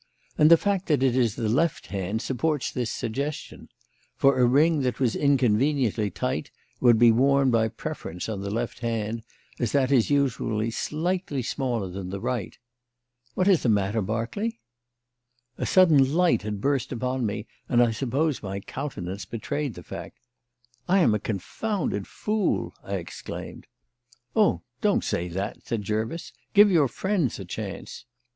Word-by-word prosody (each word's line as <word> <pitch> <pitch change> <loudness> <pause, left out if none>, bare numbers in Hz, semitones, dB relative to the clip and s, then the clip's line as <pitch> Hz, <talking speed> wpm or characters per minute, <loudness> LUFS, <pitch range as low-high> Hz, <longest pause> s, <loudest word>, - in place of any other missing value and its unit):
And 150 - +5
the 170 - +9
fact 195 0 -1
that 145 -5 +2
it 130 -2 +3
is 120 -5 +2
the 115 -2 -2
left 145 +8 +1
hand 100 +4 -2
supports 145 +2 -1
this 120 -3 -2
suggestion; 140 +6 -4 0.5
for 135 -1 +3
a 125 - +5
ring 150 +4 +4
that 125 -2 -1
was 125 -4 +1
inconveniently 130 -4 +2
tight 125 +9 -3 0.3
would 120 -3 +5
be 120 0 +7
worn 135 +3 +3
by 110 -1 +3
preference 90 -5 -6
on 105 -3 -4
the 100 - -4
left 115 +4 -3
hand, 115 -1 -2 0.4
as 120 -3 -1
that 140 -2 +2
is 125 -5 +4
usually 115 -6 0
slightly 160 - -2
smaller 120 -5 -2
than 90 0 -6
the 100 +1 -4
right. 115 -2 -3 0.8
What 185 - +1
is 190 -5 +5
the 120 - +1
matter, 105 +1 +1
Berkeley?" 115 - -2 1.0
A - - -1
sudden 155 -8 +5
light 180 0 +3
had 105 -1 -4
burst 135 -1 0
upon 125 +1 -2
me, 105 0 -2 0.2
and 120 - +3
I 120 - +2
suppose 135 +6 -1
my 100 -1 -4
countenance 100 -6 -5
betrayed 135 +5 -3
the 90 - -10
fact. - - -8 0.7
"I 190 - +4
am 115 - +4
a 105 - +1
confounded 115 - -3
fool!" 215 -3 -1
I - - -3
exclaimed. - - -7 0.7
"Oh, 215 -2 +3 0.2
don't 210 -3 +2
say 85 - -1
that," 95 +3 -5
said 115 -3 -2
Jervis. 110 - -3 0.2
"Give 205 0 +8
your 155 -6 +4
friends 185 - -1
a - - -7
chance." - - -7
125 Hz, 160 wpm, -26 LUFS, 110-150 Hz, 1.0 s, the